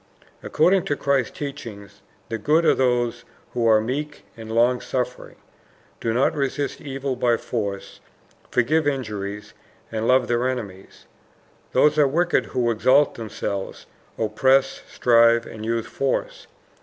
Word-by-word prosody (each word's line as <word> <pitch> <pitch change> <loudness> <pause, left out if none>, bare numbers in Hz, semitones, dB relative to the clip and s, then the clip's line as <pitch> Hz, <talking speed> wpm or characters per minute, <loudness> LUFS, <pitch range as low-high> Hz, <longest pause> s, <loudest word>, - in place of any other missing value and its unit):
According 180 +4 +2
to 145 - 0
Christ's 140 -3 0
teaching 120 -8 -7 0.4
the 115 - -3
good 155 +8 +2
are - - +5
those 120 -2 0 0.3
who 120 -2 +1
are 110 -1 +6
meek 145 +7 -4
and 110 -1 -9
long 120 +2 +2
suffering, 125 -1 -4 0.6
do 115 - -1
not 125 +7 +2
resist 140 0 -2
evil 135 -2 -4
by 120 -1 +2
force, 100 -5 -5 0.5
forgive 145 +5 +1
injuries, 105 -7 -4 0.4
and 110 0 -2
love 130 -1 +4
their 120 +1 +1
enemies; 100 -7 -7 0.7
those 150 0 +3
are 145 - +5
wicked 170 +5 +1
who 120 -2 0
exalt 130 +6 +3
themselves, 100 -3 -5 0.3
oppress, 130 +5 +2
strive, 115 -1 +4
and 110 0 -8
use 115 0 -1
force. 135 +3 -3
125 Hz, 130 wpm, -23 LUFS, 115-140 Hz, 0.7 s, are